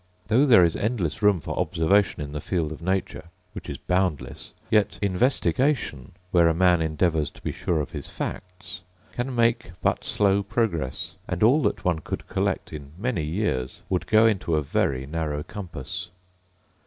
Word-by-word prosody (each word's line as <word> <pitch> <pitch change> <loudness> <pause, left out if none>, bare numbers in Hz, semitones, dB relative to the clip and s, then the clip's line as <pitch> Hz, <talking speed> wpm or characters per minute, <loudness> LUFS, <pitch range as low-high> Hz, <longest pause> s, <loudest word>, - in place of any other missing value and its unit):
Though 130 +7 +4
there 115 -8 +7
is 85 -1 +2
endless 105 -7 -1
room 105 -3 +4
for - - -5
observation 90 0 +2
in 70 - -7
the 75 0 -4
field 80 -3 -1
of 80 - -8
nature, 95 +1 -2 0.3
which - - -8
is - - -4
boundless, 90 -5 -2 0.2
yet 105 -2 +3
investigation 120 - 0 0.2
(where 85 -2 +5
a 80 - +2
man 90 -1 +4
endeavours 80 -1 +1
to - - -18
be - - -2
sure 85 -3 -1
of 75 - -3
his - - -6
facts) 90 +1 -7 0.3
can 125 +1 -3
make 115 -5 +1
but - - 0
slow 100 -1 +2
progress; 90 - -2
and 90 +2 -1
all 130 +8 +5
that 105 - -1
one 85 -3 +2
could - - -6
collect - - -2
in 70 -1 -8
many 110 -5 -1
years 75 -6 -2
would 90 -2 -1
go 110 +1 +5
into 95 -7 +1
a 75 - +1
very 65 -1 0
narrow 75 -1 -3
compass. 85 -10 -7
90 Hz, 170 wpm, -25 LUFS, 80-105 Hz, 0.3 s, there